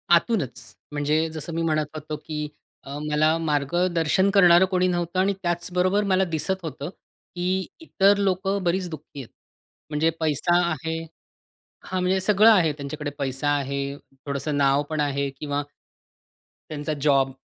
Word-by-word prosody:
आतूनच. 140 - -1 0.2
म्हणजे 150 +2 +1
जसं 160 +1 -5
मी 165 - -1
म्हणत 155 -2 +1
होतो 155 0 -5
की 150 -1 -3 0.4
अ, 140 +1 -7
मला 155 +2 +3
मार्गदर्शन 165 +4 +1
करणारं 180 -2 +7
कोणी 185 -1 +1
नव्हतं 175 0 -1
आणि 195 +1 +2
त्याचबरोबर 180 +3 +1
मला 185 +1 +4
दिसत 185 +3 -1
होतं. 155 -1 -5 0.5
की 185 +1 -1
इतर 200 -10 +3
लोकं 195 0 0
बरीच 180 +1 0
दुःखी 150 -2 -9
आहेत. 120 - -10 0.6
म्हणजे 155 +2 +1
पैसा 160 +2 +1 0.2
आहे 160 +1 -3 0.9
हां, 185 -1 -2
म्हणजे 185 +1 +2
सगळं 210 +3 +5
आहे 175 -8 +4
त्यांच्याकडे 145 +1 -5
पैसा 135 +1 -1
आहे, 140 -1 0 0.5
थोडंसं 145 +1 -2
नाव 140 0 +3
पण 155 -1 -2
आहे 140 -1 0
किंवा 145 -1 -2 1.1
त्यांचा 155 0 -3
जॉब, 135 -2 +3
160 Hz, 140 wpm, -24 LUFS, 145-185 Hz, 1.1 s, करणारं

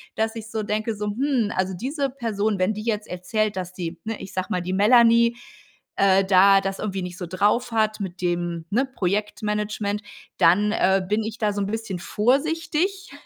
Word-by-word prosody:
dass 220 +1 -1
ich 220 0 -8
so 220 - -2
denke 215 +2 -1
so: 210 0 -4
„Hm“, 240 0 0
also 185 0 0
diese 275 - -2
Person, 220 -5 -2
wenn 185 +4 +2
die 215 0 -6
jetzt 215 -2 -2
erzählt, 205 +4 -2
dass 180 -1 -4
die, 175 -2 -5
ne, 225 -1 -4
ich 195 - -9
sage 185 0 -2
mal, 180 - -1
die 180 +1 -3
Melanie, 235 +3 +5 0.6
äh, 195 0 +4
da 195 +1 +6
das 195 0 -4
irgendwie 195 -3 -3
nicht 180 0 -6
so 180 - -5
drauf 205 +7 +1
hat 215 -1 0
mit 185 -2 -6
dem, 175 -2 -2
ne, 245 +7 +2
Projektmanagement, 210 -1 -2 0.4
dann, 205 +5 +4
äh, 190 -2 +3
bin 210 +3 0
ich 220 +1 -5
da 210 -2 0
so 205 - -2
'n 195 - -1
bisschen 215 -3 -4
vorsichtig 320 - 0
210 Hz, 190 wpm, -23 LUFS, 190-225 Hz, 0.6 s, da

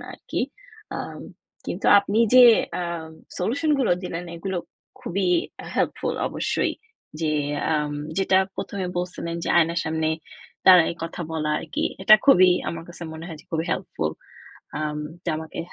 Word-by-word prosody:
না - - -10
আরকি। - - -5 0.6
আম - - -6 0.4
কিন্তু - - -3
আপনি 200 +2 -1 0.2
যে 255 -1 +10 0.4
আম 170 -2 -5 0.3
সলিউশনগুলো 270 - +1
দিলেন, 175 0 -4
এগুলো 190 +2 -4 0.4
খুবই 190 0 -1 0.5
হেল্পফুল - - -1
অবশ্যই। - - -1 0.5
যে 155 -2 +1 0.4
আম 150 -1 0 0.3
যেটা 190 0 +4 0.2
প্রথমে 195 -2 -4
বলছিলেন, 175 -1 -4
যে - - -3
আয়নার 170 0 +2
সামনে 160 0 0 0.6
দাঁড়ায় 180 -3 +7
কথা 165 - -7
বলা 155 -1 -1
আরকি। 160 - -3 0.2
এটা 215 +2 +9
খুবই, 185 -8 +7 0.2
আমার 165 0 -5
কাছে 175 0 -10
মনে 160 +1 -8
হয় 160 -4 -8
যে, - - -24
খুবই 160 0 0
হেল্পফুল। 80 - -3 0.7
আম 150 -1 -2 0.2
এটা - - -3
আমাকে 160 0 -8
170 Hz, 140 wpm, -24 LUFS, 160-190 Hz, 0.7 s, যে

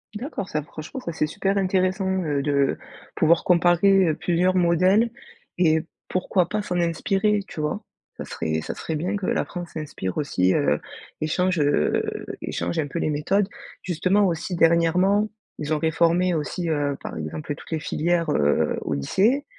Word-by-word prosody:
D'accord, 215 - -4
ça, 150 -1 -2
franchement 155 - -8
ça, 170 - -4
c'est 155 -1 0
super 195 +5 -1
intéressant, 190 0 +1 0.2
heu, 145 -3 0
de 140 -1 +1 0.4
pouvoir 165 +1 +3
comparer, 180 +2 +4
heu, 155 - +1
plusieurs 180 +2 +1
modèles 185 +6 +3 0.5
et 160 -3 +3 0.3
pourquoi 185 -1 +1
pas, 210 +2 -1
s'en 180 -3 -2
inspirer, 195 +5 +1
tu 155 - -8
vois? 150 0 -2 0.3
Ca - - -6
serait 80 0 -2
ça - - -5
serait 160 - -4
bien 180 +7 -1
que 200 - -4
la - - +1
France 175 -2 -7
s'inspire 145 - -5
aussi, 95 -11 +1
heu, - - +2 0.4
et 155 - -1
change 180 +2 +1
heu, 145 - +2 0.4
et - - -4
change 170 - -2
un 145 - 0
peu 170 - -4
les - - 0
méthodes. 190 +7 +1 0.3
Justement, 185 +4 +2
aussi 175 0 -1
dernièrement, 175 +5 +3 0.3
ils 150 +1 -1
ont - - +2
réformé 170 +3 +2
aussi, 165 +2 -2
heu, 145 -2 0
par - - -6
exemple, 115 - -4
toutes - - -14
les 160 - 0
filières, 165 +2 0
heu, 75 - +2
au 75 - -2
lycée. 215 - +1
170 Hz, 175 wpm, -24 LUFS, 150-185 Hz, 0.5 s, comparer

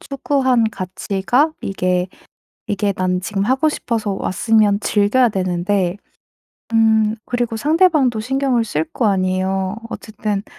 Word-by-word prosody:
추구한 265 -3 +1
가치가 195 - -1
이게 185 -1 -1 0.6
이게 200 0 0
난 180 0 -1
지금 195 +1 -2
하고 265 +7 +2
싶어서 225 -7 -2
왔으면 205 +1 +2
즐겨야 215 +5 +2
되는데 185 0 -1 0.8
음 220 -1 +3
그리고 240 -2 -2
상대방도 300 - +3
신경을 260 +1 0
쓸 160 -8 -2
거 235 - -1
아니에요. 190 0 0
어쨌든 210 -2 -4
210 Hz, 265 characters per minute, -19 LUFS, 190-245 Hz, 0.8 s, 음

